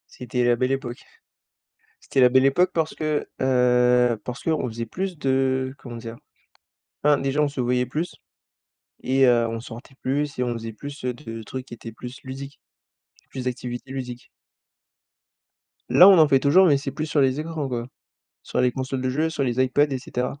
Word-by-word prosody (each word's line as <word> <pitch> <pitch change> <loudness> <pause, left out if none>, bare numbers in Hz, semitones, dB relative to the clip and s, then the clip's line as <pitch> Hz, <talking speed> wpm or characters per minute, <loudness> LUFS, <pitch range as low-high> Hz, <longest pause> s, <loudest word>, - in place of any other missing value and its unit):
C'était 125 0 -2
la 120 0 +4
belle 130 +2 0
époque. 130 -3 -4 1.0
C'était 135 - 0
la 125 - +7
belle 130 +1 +5
époque 175 +7 +3
parce 160 -1 -1
que, 155 -1 -2
heu, 125 -1 +3
parce 125 +1 -6
qu'on 160 -5 0
faisait 115 +1 -5
plus 185 - -4
de 130 -1 0
comment 120 -2 -9
dire? 115 0 -8 0.9
Enfin 145 -1 +5
déjà 135 +2 0
on 150 - +3
se 140 -2 -7
voyait 125 0 +1
plus 155 +7 -3 0.9
et 135 0 +3
heu, 120 -1 +4
on 115 0 -4
sortait 120 +2 -11
plus 140 +1 -2
et - - +1
on 120 -1 -1
faisait 115 -1 -6
plus, 140 +4 -9
heu, 125 - 0
de 115 -3 -8
trucs 130 +5 -7
qui - - -9
étaient 115 -1 -9
plus 125 +3 -9
ludiques, 135 +2 -8 0.7
plus 130 -1 -6
d'activités 125 +1 -5
ludiques. 125 -2 -6 1.6
Là 180 - +8
on 195 - +8
en 160 -2 +7
fait 135 - +5
toujours 150 +8 +5
mais 145 -5 +5
c'est 140 - -5
plus 155 - -4
sur 150 -1 0
les 135 +2 +2
écrans 160 -3 -4
quoi, 120 -2 -4 0.6
sur - - -1
les 125 0 +3
consoles 130 +1 -4
de 130 - 0
jeux, 155 +5 0
sur 155 -3 -2
les 125 -1 0
Ipad 145 +3 +2
et 130 - -1
cetera. 125 +2 -4
130 Hz, 190 wpm, -24 LUFS, 125-145 Hz, 1.6 s, Là